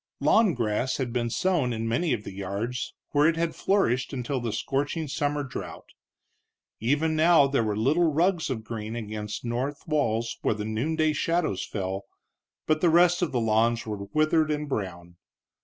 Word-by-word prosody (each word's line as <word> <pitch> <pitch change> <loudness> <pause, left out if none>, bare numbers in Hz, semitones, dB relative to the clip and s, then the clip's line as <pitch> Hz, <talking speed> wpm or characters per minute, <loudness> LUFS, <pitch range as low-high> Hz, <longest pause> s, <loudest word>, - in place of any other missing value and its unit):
Lawn 215 -6 +4
grass 115 +3 0
had 125 -4 -3
been 120 -1 0
sown 160 -3 +1
in 115 -1 -2
many 155 +8 0
of 115 -4 -1
the 100 - -8
yards, 100 +6 -4 0.2
where 145 +1 +4
it 165 - +2
had 165 -1 0
flourished 130 - +1
until 130 +1 -2
the 120 -2 -3
scorching 145 +8 -2
summer 145 +1 -1
drouth. 130 - -7 0.9
Even 150 +7 +1
now 160 -2 +6
there 140 -2 +1
were 105 -1 -1
little 155 +9 +3
rugs 170 +2 +1
of 115 -4 -3
green 110 0 -5
against 105 -1 -5
north 130 +5 -3
walls 115 -8 0
where - - +1
the 105 0 -4
noonday 155 +8 0
shadows 165 - 0
fell, 95 -1 -4 0.6
but 155 0 +1
the 175 - +4
rest 175 +2 +4
of 175 - 0
the 125 - 0
lawns 115 +1 +2
were 105 -2 -5
withered 155 0 +2
and 150 0 -1
brown. 90 -8 -5
130 Hz, 175 wpm, -26 LUFS, 110-155 Hz, 0.9 s, now